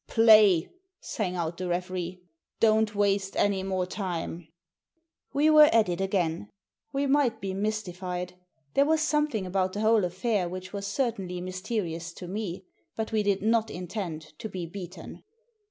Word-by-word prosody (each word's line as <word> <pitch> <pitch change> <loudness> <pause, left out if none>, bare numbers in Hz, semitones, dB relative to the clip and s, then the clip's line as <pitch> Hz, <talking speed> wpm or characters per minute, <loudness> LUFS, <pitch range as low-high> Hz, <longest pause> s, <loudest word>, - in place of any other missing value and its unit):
"Play!" 215 -7 +6 0.3
sang 185 -5 -3
out 170 -1 -3
the 185 - -3
referee. 180 0 -3 0.4
"Don't 220 -1 +3
waste 200 -1 +1
any 200 -2 +2
more 190 -1 -1
time." 175 -3 -4 0.8
We 300 +2 +3
were 305 -1 +8
at 225 -4 +4
it 175 +1 -2
again. 190 -1 -1 0.4
We 275 0 0
might 270 -5 +2
be 195 -2 -4
mystified. 185 -3 -3 0.4
There 280 +1 +4
was 315 0 +3
something 300 -10 0
about 185 0 0
the 205 - -3
whole 220 -1 +4
affair 185 +1 0
which 185 +1 -7
was 200 -1 -4
certainly 200 -6 -2
mysterious 185 -2 -4
to 180 - -9
me. 190 -1 -4 0.3
But 220 0 -3
we 220 -1 +2
did 200 -1 0
not 225 0 +2
intend 170 -4 -6
to 220 - -5
be 185 -3 -5
beaten. 175 -1 -9
195 Hz, 155 wpm, -28 LUFS, 180-220 Hz, 0.8 s, were